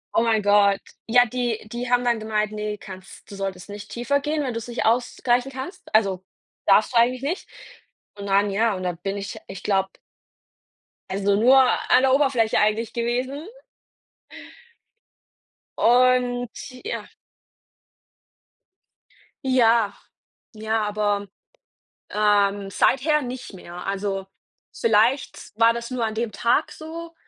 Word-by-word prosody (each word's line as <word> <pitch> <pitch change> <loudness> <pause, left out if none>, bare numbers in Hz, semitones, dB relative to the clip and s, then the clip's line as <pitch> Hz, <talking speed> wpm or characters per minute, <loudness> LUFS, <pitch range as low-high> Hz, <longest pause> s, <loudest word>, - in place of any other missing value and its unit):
Oh, - - +4
mein 225 -2 +2
Gott. 200 -1 +4 0.3
Ja, 245 +2 +5
die 240 -1 -2
die 240 +1 -4
haben 245 0 +3
dann 240 -2 +1
gemeint: 215 -1 -1
„Ne, 210 0 -4
kannst 190 0 -12
du 200 - -7
solltest 195 -2 -5
nicht 205 0 -9
tiefer 245 +4 0
gehen, 300 +1 -2
wenn 255 -3 -3
du's 230 0 -5
nicht 240 0 -3
ausgleichen 245 +2 +1
kannst.“ 265 +8 -7
Also, 195 -4 +2 0.4
darfst 205 +4 +4
du 235 - +2
eigentlich 250 +3 +3
nicht. 335 +7 -3 0.7
Und 200 -1 -7
dann 200 +1 +2
ja 215 +1 +1
und 185 - -6
dann 180 -2 -2
bin 195 +2 -3
ich, 200 -1 -6
ich 190 - -9
glaube 195 -2 +1 1.2
also 200 +1 +1
nur 250 +6 +5
an 255 0 +3
der 265 0 +3
Oberfläche 265 -6 +2
eigentlich 215 +2 +1
gewesen. 255 - -2 2.3
Und 245 0 +3 0.3
ja 460 - -4 2.4
Ja, 230 -5 +3 0.6
ja, 220 0 -1
aber 205 -1 -1 0.8
ähm, 205 -1 +1
seither 300 - +2
nicht 255 -2 -7
mehr. 180 -1 -10
Also, 195 -1 -2 0.5
vielleicht 230 +5 +1
war 230 0 +6
das 235 +1 -6
nur 250 -2 -1
an 220 - -4
dem 225 0 -2
Tag 235 +8 +1
so, 330 +1 -9
225 Hz, 130 wpm, -23 LUFS, 205-250 Hz, 2.4 s, war